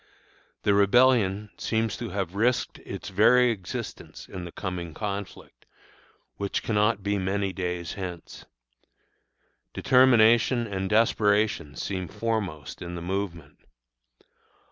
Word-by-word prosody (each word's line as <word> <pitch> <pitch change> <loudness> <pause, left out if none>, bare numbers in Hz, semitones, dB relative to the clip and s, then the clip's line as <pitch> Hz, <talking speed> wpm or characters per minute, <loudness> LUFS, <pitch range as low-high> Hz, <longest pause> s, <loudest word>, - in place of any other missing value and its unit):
The 105 - +3
rebellion 105 -1 +3
seems 110 -2 -1
to 120 -1 -5
have 95 -2 -3
risked 120 +5 0
its - - -7
very 120 +5 +5
existence 95 -5 -7
in 90 -2 -7
the 85 - -8
coming 90 -5 -5
conflict, 100 -2 -6 0.7
which 100 -1 -2
cannot 105 -1 +1
be 100 0 0
many 95 +1 -1
days 90 -3 -3
hence. 90 -3 -7 1.3
Determination 120 -1 +4
and 95 -3 -3
desperation 105 -7 +2
seem 95 +5 -4
foremost 100 -9 -3
in 85 0 -6
the 85 - -6
movement. 85 -5 -4
100 Hz, 110 wpm, -26 LUFS, 90-110 Hz, 1.3 s, very